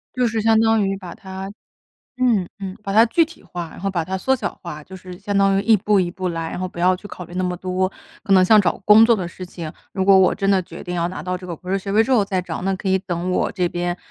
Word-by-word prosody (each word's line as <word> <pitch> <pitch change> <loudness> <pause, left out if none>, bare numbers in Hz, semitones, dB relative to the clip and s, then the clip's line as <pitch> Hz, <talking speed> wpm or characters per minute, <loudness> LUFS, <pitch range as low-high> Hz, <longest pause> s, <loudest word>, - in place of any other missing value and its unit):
就 250 -1 +2
是 225 -1 -1
相 220 0 +4
当 225 -3 +3
于 195 - -1
把 185 -3 -9
它 190 0 -8 0.7
嗯， 220 -8 +2
嗯， 190 -1 -6
把 200 - -4
它 220 +3 +6
具 330 +8 +3
体 330 - -16
化， 175 -3 -6
然 - - -12
后 195 - -2
把 175 -4 -1
它 190 +3 -3
缩 265 +8 +2
小 255 - -3
化， 155 -4 -7
就 190 +5 -11
是 180 -1 -10
相 205 0 -2
当 195 0 +3
于 195 - +1
一 225 -1 +5
步 205 0 +2
一 175 -1 -1
步 185 0 -4
来， 165 -1 -4
然 - - -5
后 185 - -2
不 175 -1 -8
要 185 +1 +3
去 205 - -11
考 180 -3 -8
虑 175 - -14
那 185 - -1
么 180 0 -2
多。 185 +1 -1 0.4
可 200 - +1
能 185 -1 +6
像 215 +2 +6
找 185 - 0
工 215 +2 +7
作 235 - +5
的 190 -5 -3
事 180 +1 -9
情， 165 -3 -7 0.2
如 190 - -1
果 195 0 +7
我 185 - +4
真 195 -1 -1
的 195 -1 +4
决 170 0 -10
定 180 -1 -5
要 170 - 0
拿 185 - -6
到 180 0 -3
这 180 - -10
个 175 - -5
博 180 +3 -9
士 195 - +1
学 195 +1 -5
位 215 +2 +5
之 245 - -4
后 225 -6 +4
再 190 -2 -1
找， - - -5
那 195 0 0
可 190 - -4
以 190 0 +3
等 180 -1 -3
我 180 - 0
这 180 -2 0
边 175 0 -2
190 Hz, 330 characters per minute, -21 LUFS, 180-205 Hz, 0.7 s, 工